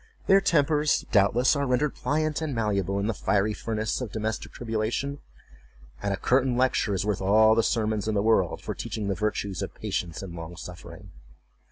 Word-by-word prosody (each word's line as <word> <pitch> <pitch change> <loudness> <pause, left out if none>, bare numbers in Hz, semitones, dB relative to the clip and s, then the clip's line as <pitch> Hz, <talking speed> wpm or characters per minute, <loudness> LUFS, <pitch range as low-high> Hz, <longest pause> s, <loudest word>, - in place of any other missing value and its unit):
Their 195 0 +5
tempers, 150 -4 +2
doubtless, 115 +6 +4
are 140 -1 0
rendered 130 +3 +1
pliant 155 +1 -1
and 150 -5 -2
malleable 100 -4 0
in 100 - -1
the 115 - 0
fiery 105 +1 +1
furnace 110 +2 -2
of 120 - -4
domestic 110 0 -3
tribulation; 120 +5 -2 0.8
and 100 - -1
a 100 - -1
curtain 130 +2 +2
lecture 125 -5 +1
is 95 - -1
worth 105 -3 -1
all 110 +3 +5
the 115 - +3
sermons 110 -2 0
in 110 - 0
the 100 - +1
world 110 -6 +2
for - - -3
teaching 105 -3 -4
the - - +1
virtues 100 -1 -2
of - - -5
patience 85 +1 -4
and 90 -3 -7
long 85 0 -8
suffering. 90 +1 -10
110 Hz, 185 wpm, -26 LUFS, 100-125 Hz, 0.8 s, Their